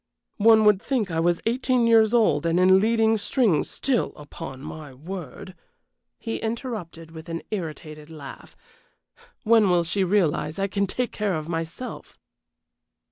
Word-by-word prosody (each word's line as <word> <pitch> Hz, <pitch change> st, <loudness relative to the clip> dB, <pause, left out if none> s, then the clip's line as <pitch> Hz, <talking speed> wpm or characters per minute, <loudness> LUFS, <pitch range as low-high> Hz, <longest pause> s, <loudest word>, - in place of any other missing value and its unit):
"One 220 Hz, 0 st, +6 dB
would 210 Hz, -2 st, +4 dB
think 230 Hz, -9 st, -1 dB
I 165 Hz, -, -1 dB
was 170 Hz, +1 st, +1 dB
eighteen 250 Hz, +1 st, +1 dB
years 225 Hz, -2 st, +5 dB
old 215 Hz, -12 st, +3 dB
and 165 Hz, +2 st, +2 dB
in 190 Hz, +1 st, +6 dB
leading 225 Hz, +1 st, +2 dB
strings 205 Hz, -, +1 dB
still, 260 Hz, -4 st, -1 dB
upon 135 Hz, -2 st, -9 dB
my 150 Hz, -2 st, -9 dB
word," 185 Hz, +5 st, -8 dB, 0.6 s
he 225 Hz, -, -4 dB
interrupted, 220 Hz, -, -5 dB
with 160 Hz, 0 st, -11 dB
an 165 Hz, 0 st, -5 dB
irritated 155 Hz, -5 st, -6 dB
laugh. 150 Hz, -4 st, -11 dB, 0.9 s
"When 220 Hz, -3 st, +4 dB
will 175 Hz, -1 st, +3 dB
she 190 Hz, +4 st, -1 dB
realize 170 Hz, -5 st, 0 dB
I 195 Hz, -, 0 dB
can 200 Hz, 0 st, -1 dB
take 250 Hz, +5 st, -2 dB
care 205 Hz, -4 st, -1 dB
of 155 Hz, -1 st, -5 dB
myself?" 165 Hz, +8 st, -6 dB
190 Hz, 145 wpm, -24 LUFS, 165-225 Hz, 0.9 s, One